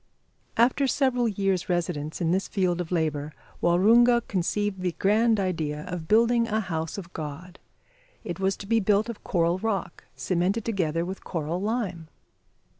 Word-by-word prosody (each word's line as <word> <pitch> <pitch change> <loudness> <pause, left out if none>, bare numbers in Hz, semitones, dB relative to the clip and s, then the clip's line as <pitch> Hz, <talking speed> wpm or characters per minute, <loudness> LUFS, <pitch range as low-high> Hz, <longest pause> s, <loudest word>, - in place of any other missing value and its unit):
After 255 +4 +3
several 255 -3 +1
years' 195 -4 -1
residence 170 -4 -2
in 165 -1 +1
this 190 +2 0
field 180 -3 0
of 175 - -7
labour, 155 -3 -1 0.3
Waroonga 235 +7 +5
conceived 195 +1 -1
the 180 -2 -1
grand 220 +2 +3
idea 160 -6 -2
of 175 -2 -6
building 230 +3 +4
a 220 -1 0
house 165 -5 -3
of 180 -3 -8
God. 160 +4 -7 0.6
It 175 - -5
was 195 0 0
to - - -8
be 225 +2 +2
built 210 +2 +2
of 230 - -7
coral 170 0 +1
rock, 200 -5 -3
cemented 190 +5 0
together 170 -6 0
with 190 +2 -6
coral 165 +1 -3
lime! 200 -7 -2
185 Hz, 155 wpm, -26 LUFS, 170-220 Hz, 0.6 s, Waroonga